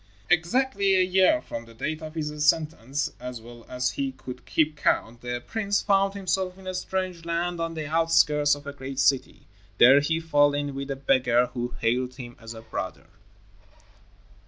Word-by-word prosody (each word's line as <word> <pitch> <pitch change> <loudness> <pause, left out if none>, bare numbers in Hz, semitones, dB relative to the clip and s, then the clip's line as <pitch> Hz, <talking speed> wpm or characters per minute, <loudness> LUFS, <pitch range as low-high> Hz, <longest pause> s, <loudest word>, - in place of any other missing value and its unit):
Exactly 200 +3 +2
a 185 - +4
year 190 +12 +3
from 115 - -7
the 115 0 -16
date 155 +6 -3
of 155 0 -8
his 150 -1 -3
sentence, 150 -3 +1
as 125 -1 -6
well 120 +1 -13
as 125 0 -1
he 135 -1 -3
could 130 -1 -10
keep 155 -1 +1
count, 120 -5 0
the 120 0 -4
prince 205 -2 0
found 195 -1 +2
himself 190 -1 -1
in 190 - -14
a 185 - -4
strange 185 -2 -3
land 170 +1 -2
on 165 0 -3
the 155 -1 -4
outskirts 150 -2 +3
of 145 0 -13
a 140 - -6
great 135 -1 -7
city. 135 -1 +1 0.3
There 130 +6 +8
he 160 +3 0
fell 145 -3 +3
in 145 -1 -2
with 140 +1 -5
a 135 - -2
beggar 125 -2 +2
who 120 -1 -4
hailed 125 +2 0
him 120 -3 -9
as 115 0 -9
a 110 - -9
brother. 110 - -5
145 Hz, 180 wpm, -26 LUFS, 125-170 Hz, 0.3 s, There